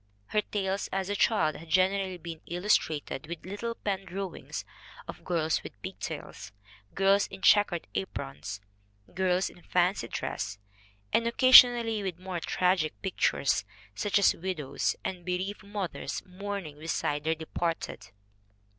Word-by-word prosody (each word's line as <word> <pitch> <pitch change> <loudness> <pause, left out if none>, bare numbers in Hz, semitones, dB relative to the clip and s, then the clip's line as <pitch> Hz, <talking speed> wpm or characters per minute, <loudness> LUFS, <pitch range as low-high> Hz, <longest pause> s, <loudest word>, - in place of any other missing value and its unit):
Her 210 - +2
tales 195 -2 -2
as 190 0 -1
a 205 - 0
child 180 -8 +2
had 165 +1 -12
generally 185 +1 +2
been 165 -2 -8
illustrated 165 -6 0
with 170 0 -7
little 220 +5 -4
pen 195 -3 -2
drawings 190 +1 -5 0.4
of - - -8
girls 160 -3 0
with - - -11
pigtails, - - -6 0.4
girls 195 +1 +4
in 190 0 -11
check 205 -1 +7
ered 175 -2 -3
aprons, 95 +1 -5 0.5
girls 185 0 +1
in 175 - -12
fancy 180 - +1
dress, 95 -3 -4 0.6
"and 230 - +3
occasionally 240 -3 +7
with 190 -4 -3
more 185 -1 -4
tragic 180 -2 +1
pictures, 190 - +1 0.3
such 205 -1 +1
as 200 - +5
widows 165 -6 -2
and 180 -2 -4
be 180 +1 0
reaved 195 +3 -4
mothers 200 -3 -4
mourning 185 -5 -6
beside 150 -2 -1
their 160 +1 +1
departed. 160 -7 -3
185 Hz, 135 wpm, -29 LUFS, 165-200 Hz, 0.6 s, check